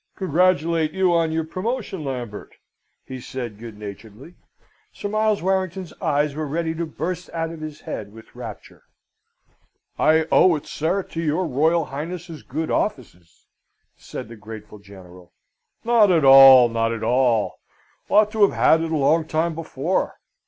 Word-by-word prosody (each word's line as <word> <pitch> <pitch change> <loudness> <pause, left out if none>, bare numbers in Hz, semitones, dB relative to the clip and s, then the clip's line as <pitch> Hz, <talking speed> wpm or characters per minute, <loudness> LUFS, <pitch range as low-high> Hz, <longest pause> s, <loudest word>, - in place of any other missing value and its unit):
"Congratulate 170 -3 +1
you 190 -2 +2
on 165 -1 +1
your 160 0 -1
promotion, 190 +1 -4
Lambert," 125 -6 -6 0.5
he 130 -1 -8
said 120 -5 -7
good 115 -2 -10
naturedly. 105 - -10 0.6
Sir - - -6
Miles 215 -2 0
Warrington's 190 -1 -2
eyes 145 0 0
were 155 +1 -4
ready 160 +2 -2
to 165 +1 -4
burst 180 +3 -5
out 165 0 -2
of 165 -2 -10
his 155 -1 -8
head 100 -1 -6
with 110 +1 -15
rapture. - - -10 1.2
"I 160 +1 +3
owe 180 -3 +5
it, 150 - -6
sir, 175 +6 -2
to 165 - -6
your 165 +3 0
Royal 160 +3 +1
Highness's 165 +2 -7
good 155 +5 -4
offices," 90 - -4 0.5
said - - -9
the 115 - -11
grateful 105 0 -11
General. 90 -3 -15 0.5
"Not 230 -4 +4
at 160 -5 +3
all; 135 -2 +9
not 115 0 -1
at 115 -1 -4
all: 120 -2 +1 0.5
ought 210 0 +4
to 220 -1 -3
have 200 - +5
had 160 - +4
it 165 0 -3
a 160 - +1
long 155 +3 +2
time 160 +2 0
before. 160 +1 -3
155 Hz, 155 wpm, -22 LUFS, 120-175 Hz, 1.2 s, all